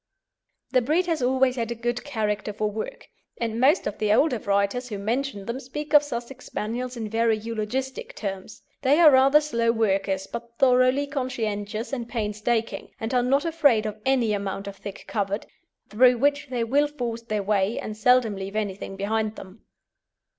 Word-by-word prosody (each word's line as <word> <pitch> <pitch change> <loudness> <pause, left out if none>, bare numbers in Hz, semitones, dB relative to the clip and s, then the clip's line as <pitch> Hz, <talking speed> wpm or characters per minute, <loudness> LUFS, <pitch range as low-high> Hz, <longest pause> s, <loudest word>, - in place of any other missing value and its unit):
The 255 - +4
breed 310 +9 +1
has 330 -5 -1
always 260 0 +2
had 230 -1 -2
a 235 - -3
good 240 +1 -2
character 210 -6 -2
for 210 0 -1
work, 480 - -6 0.3
and 230 -1 -2
most 270 +5 +4
of 210 - -4
the 210 -1 +1
older 250 +2 +3
writers 200 +5 0
who 210 - -4
mention 225 0 -2
them 235 +4 -4
speak 295 +3 -7
of 295 - +9
Sussex 255 -2 -7
Spaniels 245 +3 -4
in 220 -2 -3
very 225 0 +2
eulogistic 230 +4 -4
terms. 195 0 -6 0.2
They 285 +3 +4
are 320 -3 +8
rather 270 +2 +6
slow 235 -6 +1
workers, 195 -4 0
but 235 +2 -8
thoroughly 255 +2 +4
conscientious 230 -4 -3
and 240 -3 -3
painstaking, 225 +1 -2
and 225 +3 -3
are 250 - +4
not 275 +5 +2
afraid 290 -10 +3
of 215 0 -5
any 250 -5 +2
amount 195 -1 -3
of 200 -1 -7
thick 200 0 -8
covert, 200 0 -2 0.4
through 245 +3 +4
which 285 +3 +1
they 245 -2 -1
will 280 +6 +2
force 240 -6 -4
their 215 -3 -2
way, 200 +1 +1
and 215 - -5
seldom 235 -1 +3
leave 195 +1 -6
anything 200 -2 -3
behind 215 +2 -1
them. 190 +2 -12
230 Hz, 175 wpm, -25 LUFS, 210-260 Hz, 0.4 s, of